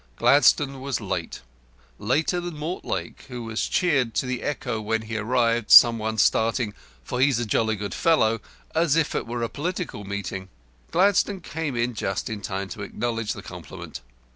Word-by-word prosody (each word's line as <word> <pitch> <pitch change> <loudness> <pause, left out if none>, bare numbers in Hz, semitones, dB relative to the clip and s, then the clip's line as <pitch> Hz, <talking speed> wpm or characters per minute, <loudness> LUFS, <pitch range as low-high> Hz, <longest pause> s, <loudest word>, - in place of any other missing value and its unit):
Gladstone 140 -1 +4
was 135 -1 -2
late - - -4 0.6
later 150 - +1
than 175 -3 -6
Mortlake, 160 +5 -4
who 125 -2 -6
was 115 -1 -2
cheered 135 -10 +1
to - - +1
the 125 -1 -3
echo 125 -6 -3
when 110 +1 -1
he 110 +1 -6
arrived, 115 0 +1
some 115 -1 +9
one 110 0 -2
starting 110 0 +2 0.3
"For 125 - -3
He's 135 -3 +4
a 120 - -1
Jolly 110 +1 +1
Good 100 0 -5
Fellow," 115 -10 +2 0.3
as 160 -2 +2
if 165 -2 +1
it - - -2
were 120 0 -3
a - - 0
political 165 - -4
meeting. 95 -1 -5 0.4
Gladstone 195 +1 +2
came 160 -5 -4
in 120 +1 0
just 95 -1 -3
in 105 -2 -5
time 95 0 -3
to 105 - -7
acknowledge 115 +1 -2
the - - -9
compliment. - - -9
120 Hz, 170 wpm, -25 LUFS, 110-145 Hz, 0.6 s, some